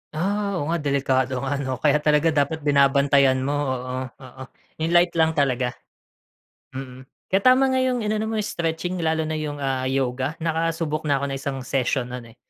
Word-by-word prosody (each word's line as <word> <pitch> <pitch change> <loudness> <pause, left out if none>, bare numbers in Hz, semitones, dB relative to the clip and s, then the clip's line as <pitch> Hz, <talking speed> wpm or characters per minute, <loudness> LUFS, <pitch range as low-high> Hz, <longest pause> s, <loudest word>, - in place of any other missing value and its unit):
Ah, 200 +3 -1
oo 145 +3 -2
nga 170 - 0
delikado 135 -2 0
nga, 140 +1 -1
'no, 130 -2 -2
kaya 150 0 +4
talaga 150 +2 +3
dapat 150 +1 0
binabantayan 140 -2 +3
mo. 140 - -1 0.2
Oo, 130 0 -3
oo. 130 0 -11 0.4
'Yung 165 +2 -1
light 175 0 +5
lang 160 0 +3
talaga. 130 -3 0 1.0
Mm. 130 -1 -8 0.2
Kaya 195 +1 +3
tama 260 +1 +5
nga 260 - +1
'yung 255 -2 +1
inano 215 +1 -1
mo 225 - -3
stretching 175 -1 -3
lalo 160 -1 0
na 155 0 -3
'yung, 145 -2 -4
ah, 130 -1 -1
yoga, 130 +2 -1
nakasubok 165 -1 -1
na 140 -1 +1
ako - - +1
ng 135 - -3
isang 135 0 -4
session 125 -1 -1
'nun, 120 -2 -8
eh. - - -44
145 Hz, 185 wpm, -23 LUFS, 130-165 Hz, 1.0 s, light